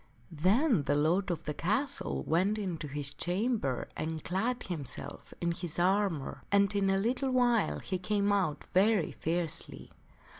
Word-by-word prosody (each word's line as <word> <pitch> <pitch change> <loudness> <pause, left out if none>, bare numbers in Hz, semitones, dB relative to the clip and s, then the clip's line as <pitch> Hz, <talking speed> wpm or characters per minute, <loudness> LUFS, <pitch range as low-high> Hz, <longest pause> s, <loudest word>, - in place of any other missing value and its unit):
Then 195 - +3
the 145 - +2
lord 170 +7 +2
of 170 -2 -2
the 150 - -3
castle 165 - 0
went 190 +6 +1
into 175 -7 -3
his 140 0 -1
chamber 180 - -1
and 160 0 -4
clad 230 +8 -1
himself 155 -8 -5
in 170 0 0
his 170 -1 -4
armor, 185 -5 +1
and 200 0 +3
in 195 -1 +2
a 195 - +3
little 250 +7 0
while 245 -3 +2
he 185 -2 -3
came 205 +1 +1
out 190 -7 0
very 200 -1 +3
fiercely. 165 0 -3
185 Hz, 150 wpm, -31 LUFS, 160-210 Hz, -, Then